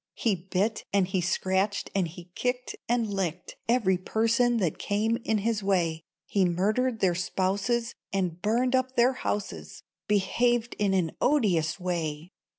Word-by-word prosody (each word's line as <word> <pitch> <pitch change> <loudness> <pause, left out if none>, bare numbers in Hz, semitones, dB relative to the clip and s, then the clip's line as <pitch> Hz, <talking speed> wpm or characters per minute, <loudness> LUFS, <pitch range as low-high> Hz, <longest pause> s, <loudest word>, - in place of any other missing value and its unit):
He 225 - +1
bit, 190 +4 -1
and 195 -2 +3
he 185 0 0
scratched, 190 +3 0
and 190 -3 +1
he 175 +2 -12
kicked, 250 +3 -2
And 235 -3 +1
licked 180 -3 -3
Every 200 -7 +3
person 230 +4 +2
that 180 -8 -1
came 220 +3 0
in 225 -2 0
his 215 +1 0
way; 175 -5 +1 0.2
He 200 - +1
murdered 215 +7 +1
their 185 -2 +3
spouses 200 +6 0 0.2
And 180 -3 -1
burned 245 +5 +2
up 260 0 0
their 245 +2 +4
houses, 205 -5 -4 0.2
Behaved 235 +4 +1
in 200 -2 +2
an 170 -4 +1
odious 185 - +2
way. 170 -2 -3
200 Hz, 150 wpm, -28 LUFS, 180-230 Hz, 0.2 s, their